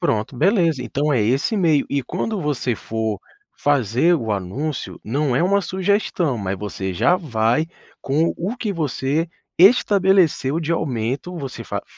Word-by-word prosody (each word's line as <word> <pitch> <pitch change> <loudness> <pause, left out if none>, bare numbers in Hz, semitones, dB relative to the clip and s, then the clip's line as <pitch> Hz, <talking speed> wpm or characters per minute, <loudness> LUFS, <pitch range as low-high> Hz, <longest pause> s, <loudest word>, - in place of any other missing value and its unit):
Pronto, 110 +4 -1
beleza. 165 - +2
Então 145 +6 -1
é 120 - +2
esse 135 - +1
meio. 160 -7 +2
E 140 -1 -1
quando 215 - -3
você 135 -5 -1
for 110 -1 -3 0.4
fazer 140 - +2
o 110 -6 -2
anúncio, 125 +11 -4
não 135 +3 0
é 165 - +2
uma 200 +2 +3
sugestão, 185 - 0
mas 95 -2 -3
você 95 -2 -4
já 175 - +3
vai 125 - 0 0.3
com 155 +5 +1
o 200 +9 -3
que 215 -4 -2
você 155 0 -1 0.3
estabeleceu 190 - +4
de 165 0 -1
aumento. 135 +4 -2
Você 135 -4 -6
fa - - -4
f - - -9
145 Hz, 155 wpm, -21 LUFS, 120-175 Hz, 0.4 s, estabeleceu